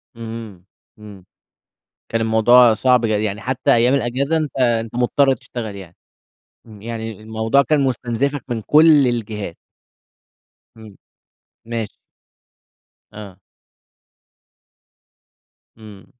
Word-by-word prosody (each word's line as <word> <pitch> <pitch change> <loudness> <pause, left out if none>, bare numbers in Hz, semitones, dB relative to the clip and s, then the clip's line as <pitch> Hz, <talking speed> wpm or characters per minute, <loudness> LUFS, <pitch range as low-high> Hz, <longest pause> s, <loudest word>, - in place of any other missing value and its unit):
امم، 115 0 -9
امم، 110 -5 -9 0.5
امم. 95 -2 -18 0.9
كان 115 - 0
الموضوع 115 +1 +5
صعب، 125 +1 +2
ي 115 - +1 0.2
يعني 105 0 -3
حتى 130 +2 0
أيام 120 +3 +3
الإجازة 135 +4 -1
أنت 155 -3 -3
أنت 115 -2 0
مُضطَر 135 +3 +2
تشتغل 110 -4 -7
يعني. 90 -3 -12 0.7
امم، 105 -3 -15
يعني 110 -2 -7
الموضوع 110 +5 +1
كان 150 0 +1
مستنزِفك 130 +2 -2
من 115 -2 -3
كلّ 150 0 +5
الجهات. 105 -6 -4 1.2
امم 110 -3 -14 0.7
ماشي. 115 -3 -5 1.2
آه. 100 -3 -11 2.4
امم. 105 -3 -14
115 Hz, 105 wpm, -19 LUFS, 110-130 Hz, 2.4 s, الموضوع